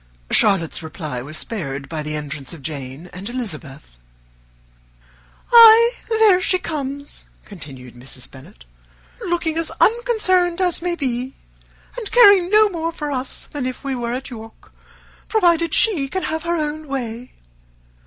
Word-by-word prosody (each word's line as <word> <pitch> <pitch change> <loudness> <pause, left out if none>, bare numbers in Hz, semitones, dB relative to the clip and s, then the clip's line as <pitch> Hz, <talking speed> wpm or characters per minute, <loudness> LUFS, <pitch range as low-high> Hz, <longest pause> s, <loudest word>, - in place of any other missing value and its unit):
Charlotte's 190 -7 +2
reply 155 -5 -6
was 150 +5 -6
spared 140 -12 -4
by 155 +1 -4
the 150 0 -4
entrance 150 -2 -6
of 155 -5 -12
Jane 140 +2 -6
and 190 +4 -6
Elizabeth. 155 - -7 1.5
"Ay, 465 0 +9 0.2
there 440 -5 +4
she 370 - +2
comes," 285 -4 -5 0.2
continued 135 - -9
Mrs. 125 +1 -8
Bennet, 130 - -15 0.6
"looking 340 -2 -1
as 330 - -1
unconcerned 400 -7 +2
as 360 -3 +1
may 350 0 -1
be, 260 -3 -3 0.6
and 440 - -6
caring 405 -7 +7
no 425 +1 +6
more 335 -4 -3
for 300 -3 -5
us 260 -1 -4
than 280 -4 -4
if 255 +1 -6
we 275 -1 -2
were 240 -2 -3
at 260 +1 -5
York, 225 -1 -12 0.6
provided 340 -6 +2
she 355 -11 +3
can 375 +7 -4
have 320 0 -2
her 340 +1 -1
own 310 -1 -3
way. 250 -3 -5
270 Hz, 145 wpm, -20 LUFS, -, 1.5 s, Ay